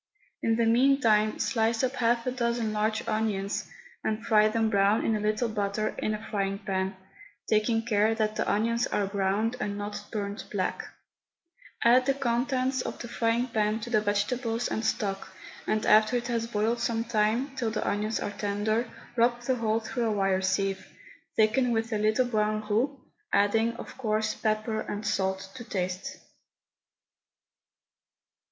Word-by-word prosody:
In 225 - +2
the 230 0 +2
meantime 230 -3 +3
slice 225 -1 +1
up 260 +1 0
half 235 -1 +2
a 255 - 0
dozen 235 -3 -1
large 215 +1 -1
onions 210 -2 -1 0.3
and 220 +1 -2
fry 215 -2 +5
them 225 +1 +1
brown 200 +1 +3
in 225 - +2
a - - -1
little 215 +3 0
butter, 215 -1 -1
in 215 - 0
a 215 +1 -9
frying 195 -1 -1
pan, 190 -1 -2 0.5
taking 225 +1 +2
care 220 -1 +2
that 215 -1 0
the - - 0
onions 230 +3 +1
are 205 - 0
browned 200 +4 0
and 205 -1 -2
not 205 0 -5
burnt 205 -1 -4
black; 190 -3 -2 1.0
add 250 +2 +5
the 275 - +3
contents 260 0 0
of - - -5
the 240 - -7
frying 230 +1 +1
pan 215 -1 0
to 240 - -6
the 215 -3 +3
vegetables 225 +3 0
and 220 - -2
stock, 195 -3 -2 0.3
and 215 0 0
after 215 +3 +5
it 240 - -4
has 230 -1 -1
boiled 225 +1 0
some 230 -1 0
time, 230 +4 0
till 240 -4 -1
the 215 -1 -2
onions 210 +2 0
are - - -3
tender, 210 +3 -1 0.3
rub 240 0 +3
the 255 +1 0
whole 225 -1 +1
through 235 +2 -2
a 225 - +1
wire 195 -2 +1
sieve, 195 0 -1 0.5
thicken 225 +4 +3
with 225 0 -1
a 215 - 0
little 215 +4 +2
brown 215 -2 0
roux, 255 +7 0 0.3
adding, 225 +3 +3
of - - -9
course, 215 -2 0
pepper 215 0 -1
and 210 0 -5
salt 190 -1 -1
to 240 - -8
taste. 185 -3 -3
220 Hz, 165 wpm, -28 LUFS, 210-235 Hz, 1.0 s, fry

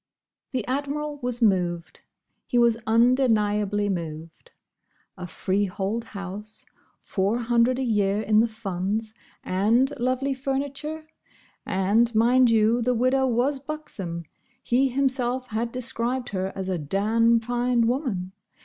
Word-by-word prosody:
The 255 -6 -3
Admiral 290 +2 -3
was 245 -1 -2
moved. 175 -5 0 0.5
He 245 - 0
was 235 -1 +5
undeniably 215 -4 +2
moved. 165 -3 -5 0.7
A 180 -1 -7
freehold 195 +5 -2
house, 205 +1 -7 0.4
Four 200 +3 0
hundred 240 +1 +2
a 265 - -1
year 205 -4 +1
in 215 0 +3
the 230 - +4
Funds, 215 0 -3 0.3
and 230 +9 +2
lovely 255 +3 0
furniture.—And, 270 -6 -2
mind 245 +3 +5
you, 225 +1 +3
the 250 +1 +1
widow 260 +3 +2
was 260 +4 +1
buxom; 205 - -6 0.4
he 265 +3 +2
himself 255 -1 -1
had 230 +2 -2
described 250 0 -2
her 190 -1 -2
as 190 -1 -4
a 185 -2 -1
"Dam 220 +9 +2
fine 240 0 +1
woman." 230 - -1
230 Hz, 120 wpm, -25 LUFS, 200-255 Hz, 0.7 s, was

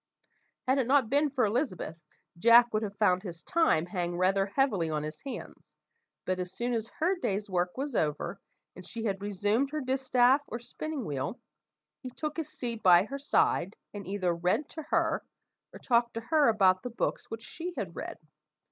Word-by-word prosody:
Had 265 +2 +3
it 250 - +1
not 265 -4 +3
been 290 +2 +3
for 260 -4 +1
Elizabeth, 205 - -2 0.3
Jack 235 +6 +6
would 215 - +1
have 205 -2 -5
found 185 -4 +3
his 170 -4 -8
time 320 - +2
hang 175 -2 -3
rather 195 +2 +2
heavily 205 -8 +1
on 150 -1 -1
his 155 +1 -6
hands, 275 - -9 0.5
but 185 0 -1
as 180 0 -4
soon 240 +5 -2
as 225 -1 -1
her 355 +5 +2
day's 200 +1 -2
work 180 +2 0
was 280 +1 -3
over, 155 +5 -1 0.4
and 185 - -10
she 225 +5 -6
had 195 -3 -1
resumed 205 +6 0
her 305 +1 -3
distaff 260 0 +3
or 235 - -4
spinning 275 +2 -5
wheel, 145 - -3 0.6
he 255 - -6
took 300 +4 -5
his 320 -2 -3
seat 235 -5 -4
by 180 -1 +7
her 275 +7 -6
side, 215 -7 +1 0.2
and 205 -2 -7
either 185 -3 0
read 180 - 0
to 320 - -7
her, - - +1 0.5
or - - -10
talked 235 -2 +1
to 230 - -3
her 295 +4 +3
about 190 -4 +4
the 250 - -5
books 235 - -2
which 225 0 -6
she 345 +2 -6
had 170 -4 -4
read. - - -6
220 Hz, 190 wpm, -30 LUFS, 185-265 Hz, 0.6 s, by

